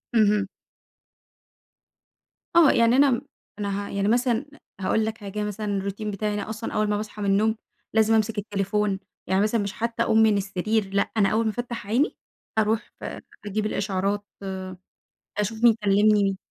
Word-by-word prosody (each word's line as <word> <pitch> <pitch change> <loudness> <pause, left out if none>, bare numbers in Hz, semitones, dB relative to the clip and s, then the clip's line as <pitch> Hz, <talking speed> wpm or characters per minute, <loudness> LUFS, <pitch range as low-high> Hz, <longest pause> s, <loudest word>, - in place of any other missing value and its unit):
اهم. 210 -2 +4 2.1
آه 330 -4 +7
يعني 230 +1 +4
أنا 275 +1 +5
م 235 - 0 0.4
أنا 200 0 -2
ه - - -9
يعني 200 0 -1
مثلًا 240 +2 +2 0.4
هاقول 215 +3 +1
لك 220 0 -3
حاجة 210 0 -5
مثلًا 210 +1 -4
الروتين 200 +2 -3
بتاعي 210 +1 -2
أنا 205 0 -4
أصلًا 220 +1 -5
أوّل 215 0 +1
ما 210 - +1
باصحى 210 0 -6
من 200 - 0
النوم 215 +3 +3 0.4
لازم 220 0 +4
أمسك 220 0 +1
التليفون، 205 -1 -1 0.3
يعني 190 +1 +2
مثلًا 215 +1 +2
مش 200 0 -3
حتّى 230 +1 -1
أقوم 220 - +2
من 215 -2 +4
السرير، 195 +2 -1
لأ 200 - +1
أنا 200 -2 +4
أوّل 225 +1 +1
ما 220 - +1
افتح 240 -2 -5
عيني 245 - +1 0.4
أروح 220 +1 +1
ف - - -14 0.4
أجيب 210 +1 -2
الإشعارات 200 0 -1 1.1
أشوف 220 +2 -2
مين 235 -2 +7
كلّمني 200 -1 +3
210 Hz, 165 wpm, -25 LUFS, 200-220 Hz, 2.1 s, آه